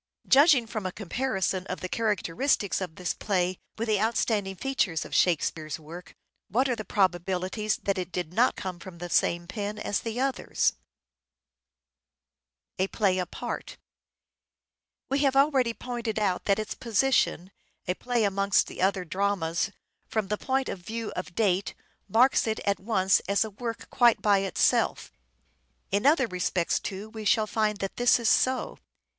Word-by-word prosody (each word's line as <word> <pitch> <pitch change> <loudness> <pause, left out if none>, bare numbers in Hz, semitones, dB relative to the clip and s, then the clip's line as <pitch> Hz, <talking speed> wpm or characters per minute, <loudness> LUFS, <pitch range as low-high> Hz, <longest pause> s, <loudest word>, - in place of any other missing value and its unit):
Judging 280 -3 +6
from 220 -2 -5
a - - -4
comparison 195 -2 -2
of 185 - -4
the 185 - -3
characteristics 210 +1 0
of 180 -4 -5
this 180 -1 -2
play 185 -3 -1 0.2
with 230 +1 -2
the 210 -2 +2
outstanding 215 -3 0
features 195 - -1
of - - -10
Shakespeare's 160 -3 +1
work, 165 +3 -11 0.3
what 255 +8 +2
are 250 - 0
the 215 - -6
probabilities 190 +2 0
that 195 -1 0
it 180 0 -5
did 175 -1 -4
not 240 +6 +3
come 185 -2 -5
from 185 -2 -10
the 175 0 -7
same 175 0 +2
pen 205 +3 -4
as 210 -1 -1
the 230 +1 -4
others? 270 0 0 2.1
We 190 - +2 2.3
have 275 -2 +2
already 270 -4 +3
pointed 235 -3 -4
out 195 -4 0
that 200 -1 +3
its 215 0 -3
position 230 -6 +1 0.4
A 180 - +1
play 240 +3 -1
amongst 200 -1 +2
the - - -8
other 190 -1 +1
dramas, 185 -1 0 0.4
from 215 -3 -2
the 210 - 0
point 265 0 0
of - - -4
view 225 +4 -5
of 180 - -4
aPart 175 - -16
date, 200 -3 +1 0.3
marks 235 +5 +4
it 220 - -1
at 200 0 0
once 190 -2 +2
as 200 +2 +3
a 220 - -7
work 230 +3 -6
quite 240 -2 +4
by 205 -2 +3
itself. 195 -1 +1 0.8
In 205 +7 +2
other 285 -3 +5
respects, 180 -3 0
too, 195 +2 -6
we 220 0 -8
shall 215 +1 +3
find 215 -1 0
that 195 -1 -5
this 245 0 +5
is 230 -2 +2
so. 260 0 +1
205 Hz, 155 wpm, -27 LUFS, 185-230 Hz, 2.3 s, Judging